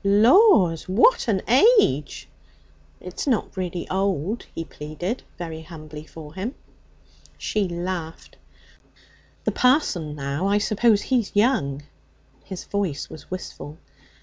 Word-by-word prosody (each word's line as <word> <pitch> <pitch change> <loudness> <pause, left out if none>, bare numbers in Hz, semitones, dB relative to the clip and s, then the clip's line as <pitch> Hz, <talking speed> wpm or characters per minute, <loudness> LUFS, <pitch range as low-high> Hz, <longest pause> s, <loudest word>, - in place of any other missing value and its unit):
'Laws! 205 - +5
what 245 - +4
an 200 -4 +1
age!' 250 - +3 0.7
'It's 180 +9 -6
not 240 -8 0
really 180 -2 -4
old,' 195 +2 -1
he 165 - -4
pleaded, 155 - -5 0.2
very 165 -2 -6
humbly 155 -2 -10
for 155 -2 -11
him. 205 +8 -4 0.8
She 210 -3 -1
laughed. 175 -2 -5 1.1
'The - - 0
parson, 220 - +1
now, 140 +5 -2
I 200 +1 +3
suppose 210 +1 +2
he's 245 -7 0
young?' 150 - +1 0.6
His 190 -2 -7
voice 195 -8 -3
was 155 - -11
wistful. 170 -4 -7
185 Hz, 115 wpm, -23 LUFS, 160-215 Hz, 1.1 s, Laws